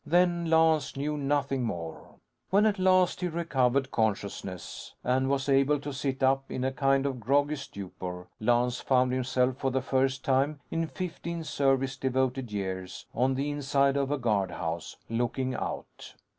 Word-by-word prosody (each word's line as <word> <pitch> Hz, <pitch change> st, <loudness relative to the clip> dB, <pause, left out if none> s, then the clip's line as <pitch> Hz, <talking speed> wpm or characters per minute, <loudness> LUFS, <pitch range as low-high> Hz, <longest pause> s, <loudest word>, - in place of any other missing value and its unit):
Then, 175 Hz, 0 st, +2 dB
Lance 160 Hz, -4 st, +3 dB
knew 150 Hz, +2 st, -1 dB
nothing 140 Hz, -2 st, 0 dB
more. 85 Hz, -8 st, -5 dB, 0.3 s
When 200 Hz, +3 st, +4 dB
at 210 Hz, -2 st, +2 dB
last 185 Hz, -1 st, +3 dB
he 180 Hz, -, +1 dB
recovered 140 Hz, -6 st, +1 dB
consciousness 100 Hz, -4 st, -3 dB
and 130 Hz, +1 st, +1 dB
was 135 Hz, -1 st, 0 dB
able 140 Hz, +1 st, +3 dB
to 145 Hz, 0 st, -5 dB
sit 135 Hz, 0 st, -2 dB
up 135 Hz, +1 st, +2 dB
in 130 Hz, -, -3 dB
a 130 Hz, -, +1 dB
kind 135 Hz, 0 st, +2 dB
of 135 Hz, -3 st, -2 dB
groggy 145 Hz, +6 st, +2 dB
stupor, 95 Hz, -8 st, -7 dB
Lance 120 Hz, +2 st, +2 dB
found 130 Hz, -1 st, +2 dB
himself, 130 Hz, 0 st, +1 dB
for 135 Hz, -, 0 dB
the 130 Hz, 0 st, 0 dB
first 130 Hz, 0 st, 0 dB
time 140 Hz, +2 st, +2 dB
in 165 Hz, 0 st, 0 dB
fifteen 170 Hz, +2 st, -5 dB
service 135 Hz, -3 st, +1 dB
devoted 130 Hz, -2 st, 0 dB
years, 95 Hz, -2 st, -4 dB
on 130 Hz, +2 st, +2 dB
the 140 Hz, +2 st, -1 dB
inside 140 Hz, -1 st, +2 dB
of 140 Hz, -1 st, 0 dB
a 145 Hz, -, 0 dB
guardhouse 95 Hz, -8 st, -2 dB
looking 125 Hz, +3 st, -1 dB
out. -, -, -6 dB
135 Hz, 155 wpm, -29 LUFS, 125-145 Hz, 0.3 s, When